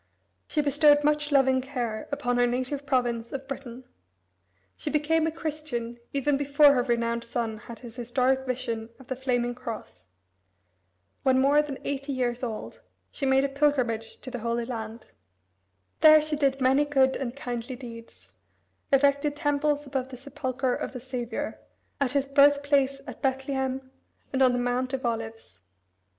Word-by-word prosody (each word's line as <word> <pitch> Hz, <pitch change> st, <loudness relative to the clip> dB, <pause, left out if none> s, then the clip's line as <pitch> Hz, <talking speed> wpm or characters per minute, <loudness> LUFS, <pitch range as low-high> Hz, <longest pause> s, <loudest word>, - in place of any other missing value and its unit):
She 305 Hz, -, +1 dB
bestowed 290 Hz, +1 st, +4 dB
much 300 Hz, 0 st, +1 dB
loving 265 Hz, -2 st, +4 dB
care 245 Hz, -5 st, -4 dB
upon 245 Hz, -3 st, 0 dB
her 245 Hz, -, +4 dB
native 260 Hz, +4 st, -2 dB
province 240 Hz, -3 st, 0 dB
of 270 Hz, 0 st, -6 dB
Britain. 260 Hz, -2 st, -7 dB, 0.9 s
She -, -, -4 dB
became 315 Hz, +2 st, +2 dB
a -, -, 0 dB
Christian 300 Hz, -8 st, -4 dB
even 280 Hz, 0 st, +1 dB
before 285 Hz, +1 st, +5 dB
her 250 Hz, -, +2 dB
renowned 235 Hz, -1 st, 0 dB
son 230 Hz, -2 st, -3 dB
had 235 Hz, +1 st, -10 dB
his 240 Hz, -1 st, -11 dB
historic 255 Hz, +2 st, +1 dB
vision 230 Hz, -3 st, -3 dB
of 265 Hz, -, -15 dB
the 260 Hz, -, -1 dB
flaming 245 Hz, -2 st, 0 dB
cross. 225 Hz, -, -8 dB, 1.1 s
When 260 Hz, -1 st, +3 dB
more 280 Hz, +3 st, +5 dB
than 290 Hz, -3 st, -5 dB
eighty 275 Hz, 0 st, -3 dB
years 245 Hz, -2 st, -1 dB
old 230 Hz, -4 st, -5 dB, 0.3 s
she 275 Hz, -, -2 dB
made 265 Hz, 0 st, +4 dB
a -, -, +2 dB
pilgrimage 270 Hz, -6 st, 0 dB
to 255 Hz, -, -7 dB
the 245 Hz, -, -4 dB
Holy 235 Hz, +1 st, -1 dB
Land. 225 Hz, -2 st, -6 dB, 0.9 s
There 310 Hz, 0 st, +9 dB
she 305 Hz, 0 st, -2 dB
did 275 Hz, -2 st, +1 dB
many 265 Hz, +2 st, +4 dB
good 270 Hz, -2 st, +3 dB
and 255 Hz, -2 st, -4 dB
kindly 245 Hz, -2 st, -5 dB
deeds, 230 Hz, -2 st, -11 dB, 0.6 s
erected 280 Hz, +1 st, +3 dB
temples 290 Hz, 0 st, 0 dB
above 265 Hz, -1 st, -3 dB
the 255 Hz, -, -9 dB
Sepulchre 260 Hz, -1 st, -2 dB
of -, -, -4 dB
the 250 Hz, -, -5 dB
Saviour, 245 Hz, -2 st, -4 dB, 0.4 s
at 275 Hz, -2 st, 0 dB
his 280 Hz, -1 st, +1 dB
birthplace 280 Hz, -1 st, +4 dB
at -, -, -9 dB
Bethlehem, 265 Hz, -1 st, -2 dB, 0.4 s
and 265 Hz, -, +1 dB
on 255 Hz, -1 st, +6 dB
the -, -, +1 dB
Mount 245 Hz, +2 st, -1 dB
of 265 Hz, -1 st, -2 dB
Olives. 225 Hz, -, -4 dB
265 Hz, 160 wpm, -27 LUFS, 240-280 Hz, 1.1 s, There